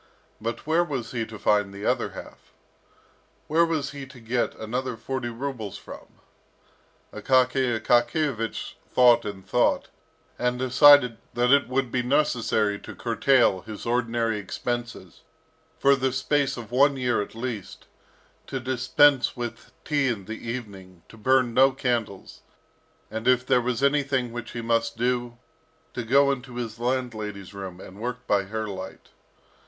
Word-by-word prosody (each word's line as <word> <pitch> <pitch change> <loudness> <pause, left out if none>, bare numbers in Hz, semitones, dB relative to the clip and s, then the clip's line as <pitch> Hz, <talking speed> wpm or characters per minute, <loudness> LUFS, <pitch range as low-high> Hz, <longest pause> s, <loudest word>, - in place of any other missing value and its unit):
But 115 +1 -4
where 160 +3 +3
was 135 -8 -4
he 115 -3 -3
to 110 - -9
find 105 -1 +2
the 100 +2 -8
other 125 -1 +1
half? - - -12 0.9
Where 160 +2 +3
was 160 -4 -1
he 140 -2 -8
to 130 -1 -14
get 120 +1 -1
another 125 +2 -4
forty 130 +1 -4
rubles 120 -4 -5
from? - - -11 1.1
Akaky 130 -2 +2
Akakiyevich 120 +1 0 0.2
thought 125 -2 +5
and 100 -2 -7
thought, - - +1 0.5
and 125 0 0
decided 130 -1 +6 0.2
that 120 +1 +2
it 140 -1 +5
would 130 -1 -1
be 125 - +1
necessary 120 -6 +1
to - - -10
curtail 120 -4 +2
his 110 0 -9
ordinary 115 -2 0
expenses, 120 -2 -5 0.6
for 140 0 +4
the 130 -1 0
space 135 +1 0
of 115 -1 -8
one 140 +2 +4
year 125 -4 +1
at 105 - -7
least, 115 -4 -6 0.6
to 135 - -3
dispense 130 +2 +3
with 120 -1 -6
tea 145 -3 +1
in 110 -6 -2
the 110 +3 -7
evening, 95 -7 -8
to - - -14
burn 125 +1 +2
no 135 +3 +6
candles, 120 -6 -3 0.7
and, 110 +2 -4
if 125 0 +4
there 125 - +3
was 125 +2 -2
anything 140 -3 +1
which 120 0 -7
he 120 - -4
must 115 0 0
do, 120 0 -1 0.6
to 125 - -3
go 140 +4 +4
into 125 -2 -5
his 115 -2 -5
landlady's 110 -6 -3
room, 95 -2 -7
and 95 +1 -12
work 125 +2 -5
by 100 -1 +1
her 110 +2 -4
light. 95 -1 -8
120 Hz, 150 wpm, -25 LUFS, 110-130 Hz, 1.1 s, decided